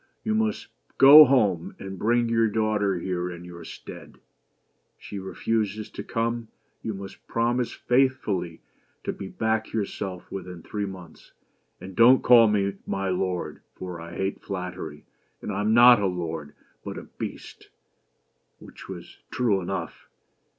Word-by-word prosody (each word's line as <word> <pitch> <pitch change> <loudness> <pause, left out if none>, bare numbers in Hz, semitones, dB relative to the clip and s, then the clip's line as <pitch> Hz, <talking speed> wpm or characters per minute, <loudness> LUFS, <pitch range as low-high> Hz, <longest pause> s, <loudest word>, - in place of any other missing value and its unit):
"You 220 - 0
must 220 0 0 0.3
go 145 +3 +11
home, 105 - +1
and 95 -1 -8
bring 120 +2 +2
your 115 0 +2
daughter 105 -3 0
here 90 0 -3
in 85 0 -9
your 85 -1 -10
stead. - - -11
If - - -31 0.8
she 100 - -6
refuses 105 +2 -2
to - - -7
come, 115 0 -2 0.3
you 110 - -4
must 95 0 -10
promise 120 +1 0
faithfully 120 -10 0 0.4
to - - -2
be 95 - -7
back 110 +1 -2
yourself 100 -3 -4
within 90 -3 -7
three 105 -1 -4
months; 90 -4 -12 0.5
and 95 0 -10
don't 125 +5 +6
call 120 -2 +7
me 100 -2 0
'my 95 0 -2
lord' 90 -1 -2
for 90 -2 -7
I 85 +1 -9
hate 95 +1 -3
flattery, 90 -6 -6 0.3
and - - -5
I 100 +1 -2
am 105 +1 +1
not 120 -1 +8
a 100 - +2
lord 80 -5 -5 0.3
but - - -6
a - - -7
Beast! - - -9 0.9
(which - - -13
was - - -9
true 110 -7 +1
enough). 85 - -5
100 Hz, 150 wpm, -25 LUFS, 90-115 Hz, 0.9 s, go